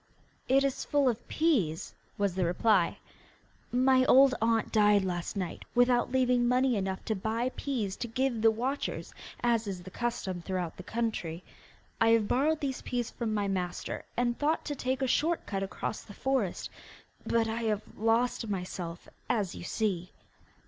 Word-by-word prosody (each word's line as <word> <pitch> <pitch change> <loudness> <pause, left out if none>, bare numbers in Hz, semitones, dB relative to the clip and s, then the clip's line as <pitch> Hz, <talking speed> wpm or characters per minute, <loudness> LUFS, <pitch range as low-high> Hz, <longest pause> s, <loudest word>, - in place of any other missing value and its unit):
'It 270 +1 +5
is 275 -1 -1
full 285 -2 +2
of 240 -2 -1
peas,' 225 - +1 0.2
was 200 -2 +1
the 185 0 0
reply. 180 +1 +2 0.7
'My 255 +1 +4
old 265 +1 +7
aunt 225 -1 +2
died 210 -2 +4
last 175 +2 -3
night, 180 -4 -4
without 245 0 +3
leaving 250 -2 +3
money 250 0 +3
enough 190 -2 -2
to 220 - 0
buy 225 +5 -1
peas 225 -9 -2
to 240 - -3
give 240 0 -1
the 225 - +6
watchers, 250 +6 -3 0.3
as 230 -2 +2
is 185 -3 -5
the 185 - -10
custom 200 -7 -3
throughout 180 -2 -3
the - - -7
country. 185 -6 -3 0.6
I 225 - +5
have 215 -2 -2
borrowed 300 +7 +2
these 270 -3 -2
peas 245 -2 -2
from 230 -3 -3
my 205 -1 0
master, 180 -2 -3
and 240 0 +1
thought 305 +2 +1
to 290 - -3
take 260 0 -1
a - - +2
short 320 +7 +1
cut 195 -2 -3
across 195 +2 -4
the 205 - -13
forest; 265 -9 -1 0.5
but 230 -1 +1
I 225 +1 -2
have 210 -1 0
lost 230 +1 +1
myself, 180 -3 -5 0.2
as 210 -7 0
you - - -8
see. 185 -3 -1
225 Hz, 170 wpm, -30 LUFS, 195-255 Hz, 0.7 s, old